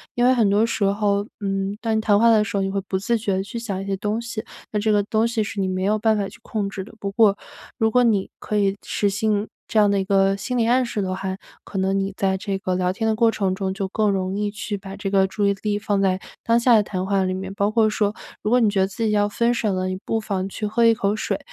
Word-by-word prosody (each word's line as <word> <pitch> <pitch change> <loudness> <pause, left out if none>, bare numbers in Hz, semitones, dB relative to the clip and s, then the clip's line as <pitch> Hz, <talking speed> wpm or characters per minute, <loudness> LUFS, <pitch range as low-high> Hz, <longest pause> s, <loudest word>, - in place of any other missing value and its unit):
因 240 - +1
为 255 - +6
很 230 -5 +3
多 205 +3 +3
时 225 -2 -2
候， 200 0 +1 0.2
嗯， 195 0 -2
当 225 -2 0
你 - - +1
谈 205 -2 +3
话 230 +1 +5
的 220 -2 +5
时 205 -1 -5
候， 195 - +1
你 195 - -1
会 200 - -1
不 190 0 -3
自 230 +5 0
觉 205 -3 -1
地 190 - -1
去 205 +4 -7
想 200 -5 -4
一 - - -6
些 195 0 -1
东 210 +3 -2
西， 230 -2 -5 0.3
那 210 - 0
这 215 +1 +1
个 205 -1 +4
东 220 +2 +1
西 230 -2 0
是 210 0 -5
你 190 - +1
没 185 0 -2
有 210 +2 +2
办 220 0 +2
法 200 -1 -1
去 - - -16
控 210 -3 -3
制 195 -1 -5
的。 210 - -14
不 200 -1 -3
过 205 -1 +4 0.4
如 220 -3 +2
果 250 +2 +4
你 210 -5 +2
可 210 - -2
以 200 -1 +2
实 205 - 0
行 210 +1 0 0.2
这 - - -2
样 205 -1 +5
的 200 0 +2
一 - - 0
个 195 0 +3
心 250 +5 -3
理 230 - +2
暗 255 +2 +3
示 225 -3 -3
的 185 -1 -2
话， 190 0 -4 0.3
可 195 - -7
能 190 +1 +1
你 195 0 -1
在 190 -1 +1
这 195 0 -3
个 185 -1 -2
聊 180 0 +1
天 225 +4 -2
的 220 - +2
过 230 +1 +4
程 195 -4 0
中， 190 0 -2
就 195 0 -3
更 210 +2 +1
容 190 -1 -1
易 205 0 -1
去 210 0 -5
把 195 0 -9
这 200 0 -4
个 195 -1 +4
注 205 +2 -1
意 200 - +3
力 210 -1 0
放 205 -1 0
在 190 -1 +2 0.2
当 230 +1 +3
下 240 +1 +4
的 215 - +6
谈 185 -2 -3
话 195 0 +1
里 185 0 -1
面， 190 +1 -5
包 200 0 +1
括 220 0 +3
说 210 -1 0 0.3
如 - - -1
果 250 +2 +4
你 230 - +4
觉 200 -1 0
得 190 - +2
自 195 +4 -5
己 215 - +1
要 205 -1 +2
分 235 +3 +1
手 225 -3 0
了， 185 0 -1
你 185 0 -3
不 225 - -1
妨 195 -3 -3
去 210 - -4
喝 220 +3 +1
一 230 0 +6
口 200 0 0
水， - - -2
205 Hz, 320 characters per minute, -22 LUFS, 195-220 Hz, 0.4 s, 为